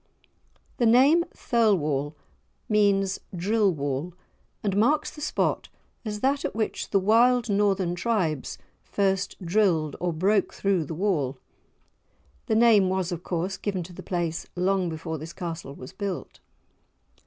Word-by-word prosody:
The 240 - +3
name 275 +9 +5
"Thirlwall" 155 - +1 0.5
means 200 -2 +2 0.2
"Drill 205 +3 +2
wall," 145 +2 -3 0.5
and 200 -2 0
marks 290 +9 +2
the 300 - -11
spot 300 - -1 0.3
as 210 -2 -5
that 275 +2 +1
at - - -3
which 220 -1 -2
the 200 - +2
wild 235 +3 +3
Northern 195 -3 +1
tribes 175 - -1 0.2
first 195 -1 -1
"drilled" 170 -6 +2
or 175 0 -1
broke 195 +5 +1
through 195 -5 0
the 160 - -6
wall. 155 -8 0 1.1
The 220 - +1
name 220 -4 +5
was, 185 -1 -1
of 175 -1 -4
course, 180 +2 -3
given 195 -4 -3
to 175 +2 -11
the - - -9
place 170 -3 -3
long 185 0 +1
before 160 0 -5
this 160 +3 -8
castle 165 -5 -6
was 130 +6 -10
built. 190 -6 -5
190 Hz, 140 wpm, -26 LUFS, 165-215 Hz, 1.1 s, name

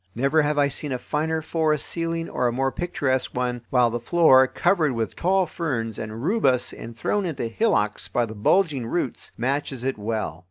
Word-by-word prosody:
Never 140 +6 +3
have 150 0 0
I 145 -1 +4
seen 145 +1 -4
a 130 - 0
finer 160 +4 -2
forest 155 -2 0
ceiling 165 0 -2
or 125 - 0
a - - +1
more 135 +2 0
picturesque 130 -7 -1
one, 125 -1 -1
while 125 -2 +3
the 120 - -2
floor, 130 -1 +5
covered 170 -2 +1
with 115 -5 -3
tall 190 +1 +2
ferns 130 - -3
and 110 +2 -6
rubus 140 - +1
and 115 0 -9
thrown 205 - 0
into 160 -9 -3
hillocks 115 - 0
by 120 - 0
the 110 - -8
bulging 135 - +1
roots, 135 -2 -3
matches 135 0 -2
it 130 -4 -2
well. 105 -6 -3
135 Hz, 190 wpm, -24 LUFS, 120-160 Hz, -, floor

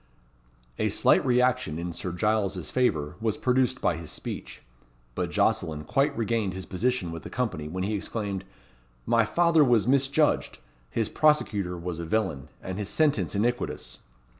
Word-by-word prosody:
A - - +2
slight - - +4
reaction 125 -9 +2
in 85 +1 -4
Sir 90 +2 -4
Giles's 95 -3 0
favour 80 - 0
was 110 -2 0
produced 130 0 +1
by 85 - +1
his 80 -2 -8
speech, - - -7 0.5
but - - -2
Jocelyn 75 -1 0
quite 140 - +1
regained 110 -4 0
his 95 -1 -6
position 105 -2 -1
with 85 0 -6
the - - -8
company 110 -12 -2
when 90 +4 -3
he 105 +3 -1
exclaimed 100 -2 -3 0.6
"My 115 -1 +3
father 170 +4 +4
was 120 -6 +3
misjudged. 140 +4 +2 0.3
His 110 - 0
prosecutor 105 - +1
was 85 -1 -5
a 85 - -4
villain, 85 -8 -1
and 95 +2 -4
his 105 -1 -3
sentence 145 0 +1
iniquitous." 100 - -2
105 Hz, 155 wpm, -27 LUFS, 90-125 Hz, 0.6 s, slight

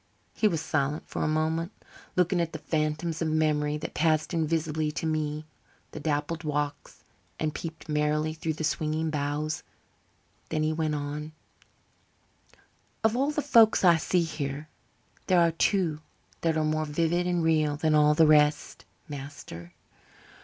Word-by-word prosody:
He 215 - +2
was 165 -6 0
silent 150 -1 -1
a - - 0
moment, 160 +3 0 0.4
looking 180 0 +2
at 165 -1 -2
the - - -3
phantoms 155 +1 -2
of 165 - +1
memory 150 -1 +1
that 150 - -6
paced 155 +1 +1
invisibly 160 -1 0
to 165 - -3
me 155 -1 -1 0.5
the - - -7
dappled 155 +2 -2
walks 145 -1 -3 0.4
and 155 -1 -1
peeped 160 -1 -7
merrily 150 +1 0
through 160 0 -3
the 160 - -5
swinging 155 +1 -1
boughs. 150 +1 -2 0.9
Then 155 -1 0
he 155 0 +1
went 155 -1 -1
on: 150 +1 -5 1.7
"Of 220 +1 +3
all 275 +3 +1
the 300 -1 -1
folks 230 -8 +5
I 170 -2 +7
see 175 +2 +1
here 150 -2 -4 0.6
there 185 -2 +4
are 170 -1 +4
two 165 -2 +1 0.4
that 165 -1 +1
are 155 - +1
more 155 0 0
vivid 170 +4 0
and 175 -2 +1
real 155 -2 +2
than 155 0 +1
all 150 0 +5
the 160 - +6
rest, 150 -1 +3 0.2
master. 135 - -9
155 Hz, 150 wpm, -28 LUFS, 150-165 Hz, 1.7 s, I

